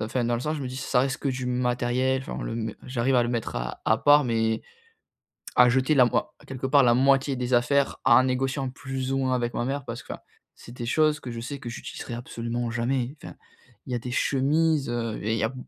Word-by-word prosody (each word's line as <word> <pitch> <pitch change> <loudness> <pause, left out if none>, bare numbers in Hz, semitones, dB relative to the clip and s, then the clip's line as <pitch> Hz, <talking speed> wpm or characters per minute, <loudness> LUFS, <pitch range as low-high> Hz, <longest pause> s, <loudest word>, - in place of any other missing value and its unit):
Enfin 120 +3 -1
dans 120 - +1
le 120 - -2
sens, 155 +4 -2
je 145 - -5
me 130 - -4
dis, 130 - -7
ç - - -5
ça 125 -1 +2
reste 135 0 -1
que 140 - -2
du 130 -1 -3
matériel, 125 +1 0
enfin - - -5
le - - -4
m 110 -2 -3
j'arrive 130 +1 0
à 125 - +5
le 120 - -1
mettre 115 - -3
à - - -4
à 110 - +3
part 145 +1 +5
mais, 110 -1 0 1.0
à 125 0 +7
jeter 130 +4 +2
la 125 - +7
moi 120 - -1
quelque 130 0 -5
part, 140 0 +5
la 120 -1 +5
moitié 135 +2 +3
des 125 0 -2
affaires 135 +4 +2
en 125 0 +6
négociant 130 +1 -1
plus 130 0 -5
ou - - +1
moins 130 -1 +1
avec 120 -1 -2
ma 120 - -1
mère, 135 +1 -3
parce 115 +1 -6
que - - -6
enfin, - - -11 0.3
c'est - - -13
des 120 -1 -6
choses 155 +4 +2
que 125 - -7
je 115 - -6
sais 140 +4 -6
que 120 - -7
j'utiliserai 120 0 -7
absolument 120 0 -4
jamais. 120 +3 -1
Enfin, - - -9 0.5
il - - -8
y - - +1
a - - -1
des 125 +2 -6
chemises, 145 +3 +1
heu, 115 -2 -2
et 110 +2 0
il - - 0
y - - 0
a 110 - +1
b 130 - -11
125 Hz, 255 wpm, -26 LUFS, 120-135 Hz, 1.0 s, à